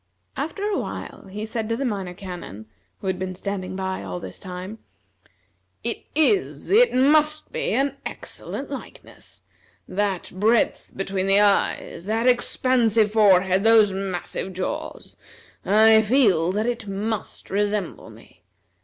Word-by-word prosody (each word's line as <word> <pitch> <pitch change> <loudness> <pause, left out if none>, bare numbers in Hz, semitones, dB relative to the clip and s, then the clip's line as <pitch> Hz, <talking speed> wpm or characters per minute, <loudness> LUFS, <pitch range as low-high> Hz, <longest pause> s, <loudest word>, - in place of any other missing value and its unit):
After 325 +8 -4
a 415 -2 0
while - - -7
he 210 +3 -5
said 220 0 -3
to 230 - 0
the 275 - -2
Minor 195 -6 -3
Canon, 175 - -8 0.4
who - - -9
had 190 -1 -1
been 185 0 -4
standing 185 -1 -4
by 190 0 -3
all 90 -2 -5
this 95 0 -9
time: 185 +3 -7 1.0
"It - - -3
is, 380 +7 +1
it 470 +5 +6
must 300 +4 +3
be, - - -2
an 275 +3 0
excellent - - -7
likeness! - - -10 0.4
That 195 -2 -2
breadth 215 +5 +1
between 195 0 -2
the 195 +1 +5
eyes, 200 -3 +1
that 225 +3 0
expansive 240 -3 +2
forehead, 190 -3 +4
those 220 -3 +5
massive 190 0 -4
jaws! 185 +1 -5 0.5
I 220 +2 +6
feel 205 -8 +3
that 210 +3 -1
it 240 -2 -3
must 205 +2 -4
resemble 205 -2 -2
me. - - -17
205 Hz, 135 wpm, -23 LUFS, 190-230 Hz, 1.0 s, it